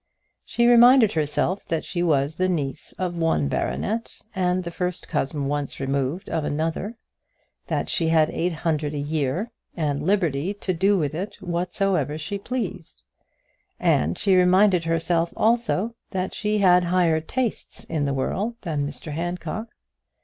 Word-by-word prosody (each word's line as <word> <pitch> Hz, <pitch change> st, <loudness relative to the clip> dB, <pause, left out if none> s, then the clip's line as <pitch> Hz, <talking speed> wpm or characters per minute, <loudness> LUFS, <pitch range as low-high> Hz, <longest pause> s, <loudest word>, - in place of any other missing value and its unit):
She 235 Hz, -, +1 dB
reminded 240 Hz, -1 st, +7 dB
herself 160 Hz, +5 st, 0 dB
that 165 Hz, -1 st, -1 dB
she 175 Hz, -, -2 dB
was 155 Hz, -2 st, +1 dB
the 185 Hz, 0 st, +1 dB
niece 145 Hz, -7 st, -2 dB
of 180 Hz, -2 st, -3 dB
one 165 Hz, -, +1 dB
baronet, 220 Hz, -, -2 dB, 0.2 s
and 185 Hz, -1 st, 0 dB
the 170 Hz, -, -5 dB
first 180 Hz, 0 st, -3 dB
cousin 145 Hz, -2 st, -1 dB
once 145 Hz, 0 st, -2 dB
removed 140 Hz, +6 st, -2 dB
of 160 Hz, -2 st, -1 dB
another, 160 Hz, +9 st, -2 dB, 0.7 s
that -, -, -1 dB
she 165 Hz, -, +1 dB
had 160 Hz, -1 st, +3 dB
eight 175 Hz, +2 st, -1 dB
hundred 155 Hz, -2 st, -1 dB
a -, -, -2 dB
year, 145 Hz, -, -1 dB, 0.3 s
and 145 Hz, -3 st, -1 dB
liberty 175 Hz, -1 st, 0 dB
to 190 Hz, -2 st, -2 dB
do 195 Hz, +4 st, +3 dB
with 150 Hz, -5 st, -1 dB
it 185 Hz, +6 st, -4 dB
whatsoever 175 Hz, -4 st, -1 dB
she 190 Hz, +6 st, -4 dB
pleased; 220 Hz, -7 st, -5 dB, 0.8 s
and 80 Hz, +4 st, +2 dB
she 195 Hz, -2 st, +3 dB
reminded 185 Hz, -1 st, +4 dB
herself, 165 Hz, +1 st, +1 dB
also, 230 Hz, -1 st, +1 dB, 0.2 s
that 185 Hz, -2 st, -3 dB
she 210 Hz, 0 st, 0 dB
had 180 Hz, -3 st, +5 dB
higher 170 Hz, -3 st, +2 dB
tastes 245 Hz, +7 st, -3 dB
in 155 Hz, -3 st, -2 dB
the 140 Hz, -, 0 dB
world 205 Hz, -, -1 dB
than 150 Hz, -6 st, -2 dB
Mr 150 Hz, +2 st, -7 dB
Handcock. 175 Hz, +6 st, -4 dB
170 Hz, 150 wpm, -24 LUFS, 150-195 Hz, 0.8 s, reminded